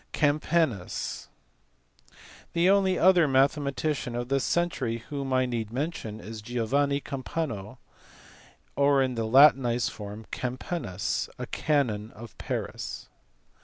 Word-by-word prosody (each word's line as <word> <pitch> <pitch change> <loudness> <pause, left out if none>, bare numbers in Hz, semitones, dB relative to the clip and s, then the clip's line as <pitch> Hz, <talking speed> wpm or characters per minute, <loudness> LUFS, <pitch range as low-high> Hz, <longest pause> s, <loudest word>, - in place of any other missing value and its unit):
Campanus. 150 - 0 1.2
The 175 +3 +4
only 190 -2 +3
other 180 -3 +5
mathematician 140 -1 +1
of 120 +1 -3
this 135 -1 +1
century 145 -9 0
whom 140 -2 -4
I 130 0 +3
need 115 -3 -3
mention 125 -5 -4
is 110 0 -8
Giovanni 130 +5 0
Campano, 130 -6 -4 1.0
or 140 -1 +4
in 130 -1 -1
the 115 -2 -2
latinized 125 -1 +5
form 105 +1 -8
Campanus, 125 - -3
a - - -4
canon 115 -8 0
of 115 +1 -11
Paris. - - -5
135 Hz, 110 wpm, -27 LUFS, 115-150 Hz, 1.2 s, other